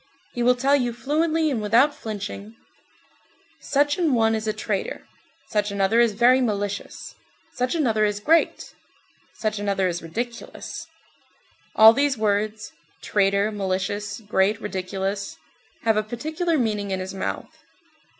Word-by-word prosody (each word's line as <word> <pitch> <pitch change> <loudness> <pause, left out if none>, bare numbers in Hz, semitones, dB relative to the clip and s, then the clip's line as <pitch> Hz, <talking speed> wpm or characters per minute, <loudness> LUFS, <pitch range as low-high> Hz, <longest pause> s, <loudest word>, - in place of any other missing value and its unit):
He 240 - -3
will 250 +1 +4
tell 270 +3 +3
you 245 -4 0
fluently 310 +5 0
and 235 -5 -1
without 235 +8 +4
flinching: 210 -1 -7 1.0
"Such 290 +3 +1
an 320 -7 +2
one 225 -1 +3
is 220 0 -2
a - - +2
traitor; 210 -2 -4 0.4
such 210 -1 0
another 200 +3 +2
is 235 -3 +4
very 245 +4 +4
malicious; 205 -4 -3 0.4
such 250 +5 -1
another 225 -9 +1
is 205 -1 0
great; 325 +10 +1 0.6
such 215 -1 -2
another 200 -2 0
is 175 -1 -3
ridiculous." 235 - -6 0.9
(All 220 +1 +9
these 280 0 +1
words: 215 0 -1 0.3
traitor, 200 +1 +2
malicious, 205 +2 -3
great, 205 0 +1
ridiculous, 195 0 -4 0.5
have 225 -1 +2
a - - +3
particular 310 - -2
meaning 210 -5 -1
in 190 -1 -2
his 185 +1 -5
mouth.) 190 - -5
215 Hz, 135 wpm, -24 LUFS, 205-250 Hz, 1.0 s, All